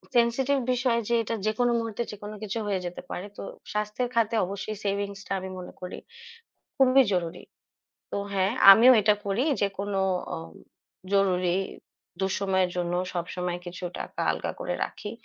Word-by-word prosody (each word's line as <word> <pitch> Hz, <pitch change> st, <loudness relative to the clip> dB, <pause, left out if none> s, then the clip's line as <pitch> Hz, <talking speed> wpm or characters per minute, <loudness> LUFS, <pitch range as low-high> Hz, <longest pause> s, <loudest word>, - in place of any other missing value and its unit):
sensitive 260 Hz, +4 st, +3 dB
বিষয় 245 Hz, -2 st, +1 dB
যে 235 Hz, -, +3 dB
এটা 230 Hz, +1 st, -2 dB
যেকোনো 240 Hz, +3 st, +2 dB
মুহূর্তে 230 Hz, 0 st, -3 dB
যেকোনো 210 Hz, 0 st, -8 dB
কিছু 215 Hz, +2 st, -3 dB
হয়ে 195 Hz, -2 st, 0 dB
যেতে 175 Hz, 0 st, -5 dB
পারে। 185 Hz, -, -4 dB
তো -, -, -6 dB, 0.3 s
স্বাস্থ্যের 210 Hz, +4 st, -1 dB
খাতে 230 Hz, -1 st, +2 dB
অবশ্যই 200 Hz, +3 st, -5 dB
savings 200 Hz, 0 st, -1 dB
টা -, -, -13 dB
আমি 190 Hz, 0 st, -6 dB
মনে 180 Hz, -, -9 dB
করি 180 Hz, -, -6 dB, 0.8 s
খুবই 265 Hz, 0 st, +6 dB
জরুরি। 170 Hz, -3 st, -2 dB, 0.7 s
তো -, -, -3 dB, 0.2 s
হ্যাঁ, 195 Hz, +1 st, +2 dB, 0.2 s
আমিও 235 Hz, +6 st, +8 dB
এটা 210 Hz, +1 st, +5 dB
করি 200 Hz, +6 st, +1 dB, 0.2 s
যে 200 Hz, -, +3 dB
কোনো 200 Hz, -1 st, -1 dB, 0.3 s
অ -, -, -3 dB, 0.8 s
জরুরি 185 Hz, -2 st, +3 dB, 0.7 s
দুঃসময়ের 190 Hz, -1 st, +1 dB
জন্য 175 Hz, 0 st, -1 dB, 0.2 s
সবসময় 180 Hz, 0 st, -3 dB
কিছু 175 Hz, +1 st, -7 dB, 0.2 s
টাকা -, -, -6 dB
আলগা -, -, -3 dB
করে -, -, -2 dB
রাখি, 205 Hz, -, -7 dB
200 Hz, 155 wpm, -27 LUFS, 185-230 Hz, 0.8 s, আমিও